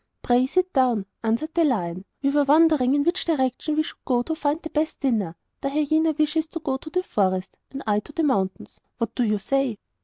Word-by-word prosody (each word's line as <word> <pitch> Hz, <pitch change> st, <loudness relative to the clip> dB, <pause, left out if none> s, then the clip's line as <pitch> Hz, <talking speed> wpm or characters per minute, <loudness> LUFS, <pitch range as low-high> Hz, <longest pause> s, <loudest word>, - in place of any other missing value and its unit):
'Pray 245 Hz, +1 st, +3 dB
sit 365 Hz, +5 st, 0 dB
down,' 245 Hz, -7 st, +2 dB, 0.2 s
answered 235 Hz, +8 st, -1 dB
the 340 Hz, -, +3 dB
lion. 185 Hz, -, -1 dB, 0.2 s
'We 275 Hz, -, +3 dB
were 290 Hz, 0 st, +3 dB
wondering 290 Hz, -3 st, +4 dB
in 290 Hz, -, +2 dB
which 345 Hz, +4 st, +1 dB
direction 295 Hz, -1 st, 0 dB
we 310 Hz, -, +2 dB
should -, -, -10 dB
go 245 Hz, -2 st, +1 dB
to 320 Hz, -, -3 dB
find 300 Hz, -1 st, -1 dB
the 320 Hz, -, -6 dB
best 310 Hz, +1 st, -1 dB
dinner. 215 Hz, -11 st, 0 dB, 0.3 s
The 275 Hz, -, -1 dB
hyena 310 Hz, +2 st, +2 dB
wishes 310 Hz, +1 st, +1 dB
to 330 Hz, -, -6 dB
go 270 Hz, -4 st, -2 dB
to 310 Hz, -, -10 dB
the 365 Hz, +3 st, -1 dB
forest, 185 Hz, -, -1 dB
and 275 Hz, 0 st, -7 dB
I 210 Hz, -1 st, +2 dB
to 210 Hz, -, -12 dB
the 320 Hz, -, -1 dB
mountains. 195 Hz, -10 st, -1 dB, 0.2 s
What 230 Hz, -1 st, -2 dB
do 250 Hz, -, 0 dB
you 215 Hz, -2 st, +1 dB
say? 265 Hz, +2 st, 0 dB
275 Hz, 220 wpm, -24 LUFS, 230-310 Hz, 0.3 s, wondering